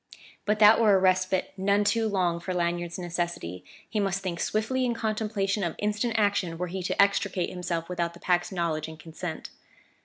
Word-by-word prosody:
But 210 +1 +2
that 215 +1 +7
were 210 -3 +6
a - - +6
respite 185 0 +1
none 200 +2 +2
too 225 +2 +2
long 180 -4 0
for 180 +2 -4
Lanyard's 175 0 -1
necessity; 170 - -4 0.2
he 215 - -2
must 195 -1 -1
think 175 -3 -3
swiftly 225 +5 0
in 240 -2 0
contemplation 215 -3 -1
of 170 -2 -2
instant 210 +3 -1
action 200 -5 +1
were 180 - -2
he 185 +2 -5
to 180 - -3
extricate 200 -2 +2
himself 170 -2 -3
without 170 -1 -2
the - - -13
Pack's 175 +1 +1
knowledge 170 -4 -1
and 160 -1 -10
consent. 160 +1 -6
185 Hz, 185 wpm, -27 LUFS, 170-205 Hz, 0.2 s, that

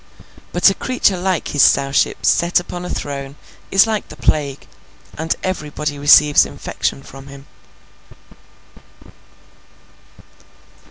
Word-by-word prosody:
But, 175 +2 +4
a - - -2
creature 250 -4 0
like 180 -1 -2
his 145 - 0
Sowship 135 0 +2
set 170 +1 +2
upon 175 0 -8
a - - -6
throne 140 -1 -6 0.3
is 195 +2 +5
like 220 -2 -3
the - - -11
Plague, 140 -3 -1 0.5
and 160 +1 -2
everybody 150 -4 -4
receives 145 +1 +6
infection 135 - -5
from 135 0 -13
him. 140 0 -13
150 Hz, 110 wpm, -18 LUFS, 140-180 Hz, 0.5 s, receives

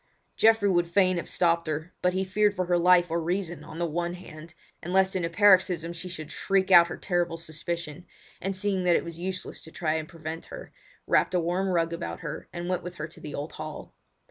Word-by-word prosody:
Geoffrey 225 -2 +4
would 175 -3 +2
fain 185 0 +3
have 170 - -4
stopped 170 -1 +2
her, 155 +3 -4
but 180 0 +2
he 190 +1 0
feared 205 +2 +2
for 185 - -1
her 175 0 +2
life 175 -1 +5
or 170 +1 0
reason 175 -1 -2
on 155 +1 -10
the 170 - 0
one 170 +2 -2
hand, 165 -2 -12 0.3
and 175 - -6
lest 190 0 +3
in 185 - 0
a 165 - 0
paroxysm 185 -3 +4
she 175 +2 -5
should 155 -4 -7
shriek 195 -1 0
out 170 -2 +9
her - - -6
terrible 175 -3 -1
suspicion, 165 0 -5 0.3
and 195 +1 -2
seeing 190 -1 0
that 175 -1 +4
it - - 0
was 170 0 -8
useless 185 +1 -4
to - - -12
try 160 -1 -1
to 155 - -7
prevent 165 0 -7
her, - - -10 0.3
wrapped - - +2
a - - +4
warm 175 +3 0
rug 170 -2 +1
around 170 +1 -5
her 150 -3 -6
and 175 0 -5
went 185 0 -1
with 180 +1 -8
her 155 0 -5
to 165 - -14
the 150 - -6
old 145 +2 -5
hall. 155 -1 -8
175 Hz, 230 wpm, -27 LUFS, 165-185 Hz, 0.3 s, out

